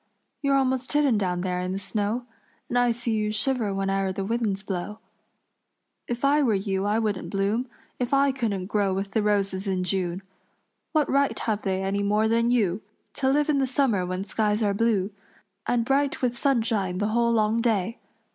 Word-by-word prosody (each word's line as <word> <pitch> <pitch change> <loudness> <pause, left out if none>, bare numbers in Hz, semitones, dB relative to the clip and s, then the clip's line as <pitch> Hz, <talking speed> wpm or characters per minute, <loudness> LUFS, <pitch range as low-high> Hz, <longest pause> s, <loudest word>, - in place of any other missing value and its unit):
"You're 280 -1 +3
almost 260 -1 0
hidden 285 -7 +3
down 180 -3 -1
there 180 -1 -1
in 180 +1 -2
the - - -2
snow, 210 +4 -2 0.4
And 245 - +2
I 245 -1 +3
see 235 0 -3
you 215 -1 0
shiver 230 0 +1
whene'er 195 0 0
the 190 +1 -3
winds 215 -3 -1
blow. 195 +2 -4 1.1
If 240 +3 -2
I 290 +2 +4
were 235 -7 +3
you 195 0 -1
I 210 +1 +2
wouldn't 205 -6 -1
bloom 205 +6 0 0.3
If 245 -1 -1
I 275 0 +4
couldn't 220 -8 -2
grow 200 -1 0
with 195 +1 -3
the 220 - +1
roses 200 -2 0
in 185 -1 0
June. 185 0 -2 0.7
What 310 -3 +2
right 280 0 +2
have 215 -2 -1
they 190 -1 -1
any 195 +1 0
more 210 +2 +2
than 230 +1 +2
you, 210 -5 +1 0.3
To 265 - 0
live 290 +2 +2
in 295 -2 +2
the 265 - +1
summer 250 -7 +1
when 185 +1 -3
skies 210 +1 0
are 205 -1 +2
blue 205 -2 +1 0.6
And 235 -1 +1
bright 275 +1 +1
with 245 -1 +1
sunshine 225 -8 0
the 205 +2 0
whole 235 +1 +2
long 220 0 +2
day? 225 -1 0
215 Hz, 190 wpm, -25 LUFS, 195-245 Hz, 1.1 s, I